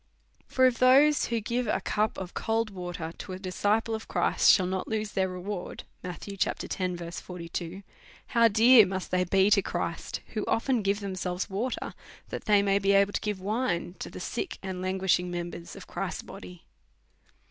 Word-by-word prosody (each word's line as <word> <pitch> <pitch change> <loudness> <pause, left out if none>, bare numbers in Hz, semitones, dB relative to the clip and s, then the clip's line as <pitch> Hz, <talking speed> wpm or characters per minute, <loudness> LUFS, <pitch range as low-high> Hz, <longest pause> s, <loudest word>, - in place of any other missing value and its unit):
For 260 - +3
if 250 -2 +2
those 275 +4 +6
who 230 -1 -1
give 235 +3 -2
a - - +1
cup 215 +1 -1
of 185 -1 -6
cold 225 -1 -1
water 175 -3 -5
to 185 - -6
a - - -5
dis 185 -1 -7
ciple 220 +2 +2
of 220 0 -5
Christ - - +2
shall 185 - +4
not 185 +1 -2
lose 215 -1 -2
their 190 -1 0
reward, 180 +1 -5 0.2
how 180 -1 -4 2.3
dear 225 +2 +7
must 190 0 -4
they 185 0 +2
be 190 +3 +3
to 200 - +6
Christ 175 -2 -4
who 215 - -3
often 245 +1 +1
give 200 +1 0
themselves 185 -1 -3
wa 215 +7 -1
ter, - - -5 0.4
that - - -6
they 205 -1 +4
may 200 0 +3
be 200 0 +2
able 200 +1 +4
to - - -1
give 210 -3 -2
wine 200 -3 -1
to - - -5
the - - -9
sick 380 - -4
and 190 -1 -4
lauguishing 185 -1 +1
members 175 -1 -6
of - - -10
Christ's - - -4
body 90 -1 -11
200 Hz, 175 wpm, -28 LUFS, 185-220 Hz, 2.3 s, dear